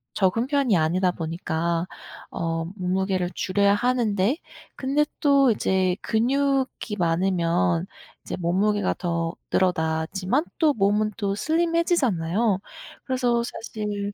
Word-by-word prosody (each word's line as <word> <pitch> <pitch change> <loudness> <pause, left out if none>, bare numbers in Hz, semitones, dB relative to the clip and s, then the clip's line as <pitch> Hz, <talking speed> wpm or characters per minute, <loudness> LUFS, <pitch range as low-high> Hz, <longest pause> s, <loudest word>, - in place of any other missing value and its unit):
적은 210 +5 +1
편이 270 - +2
아니다 180 +4 +2
보니까 165 0 -2 0.4
어 165 -1 -2
몸무게를 185 -1 -1
줄여야 200 +1 +2
하는데 235 - +1 0.4
근데 280 +3 +1 0.2
또 275 -4 +5
이제 190 -3 +1
근육이 265 -1 0
많으면 165 - +1 0.4
이제 - - -4
몸무게가 200 +4 +1
더 170 -2 -1 0.2
늘어나지만 180 - 0
또 310 -3 +4
몸은 210 0 +1
또 200 -2 -1
슬림해지잖아요. 245 - +1 0.5
그래서 245 -3 +1
사실 210 -3 -4
200 Hz, 255 characters per minute, -24 LUFS, 175-245 Hz, 0.5 s, 또